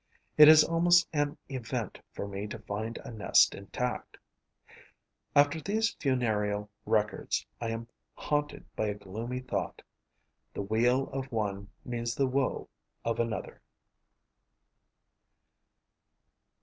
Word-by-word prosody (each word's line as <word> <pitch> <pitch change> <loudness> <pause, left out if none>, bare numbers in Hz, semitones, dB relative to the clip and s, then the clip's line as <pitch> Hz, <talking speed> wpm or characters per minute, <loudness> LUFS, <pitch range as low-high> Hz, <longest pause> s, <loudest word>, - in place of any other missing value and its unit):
It 150 -1 +10
is 155 0 +9
almost 175 +1 +4
an 145 -1 0
event 125 -4 -4
for 100 - -5
me 100 +1 -5
to - - -6
find 110 +3 -5
a - - -7
nest 110 -3 +4
intact. 125 +5 -4 1.2
After 145 +2 +4
these 220 +5 0
funereal 105 -6 0 0.2
records, 105 -1 0 0.2
I 115 - -1
am 115 0 -4 0.3
haunted 145 0 -2
by 110 - 0
a 105 - -2
gloomy 110 +6 -5
thought: 130 - -4 0.7
the - - -2
weal 120 +6 +2
of 135 0 -5
one 100 -3 -2 0.2
means 120 -1 -3
the 140 - +2
woe 130 0 -1 0.4
of 115 -1 -1
another. 115 -4 -3
120 Hz, 115 wpm, -30 LUFS, 105-140 Hz, 1.2 s, It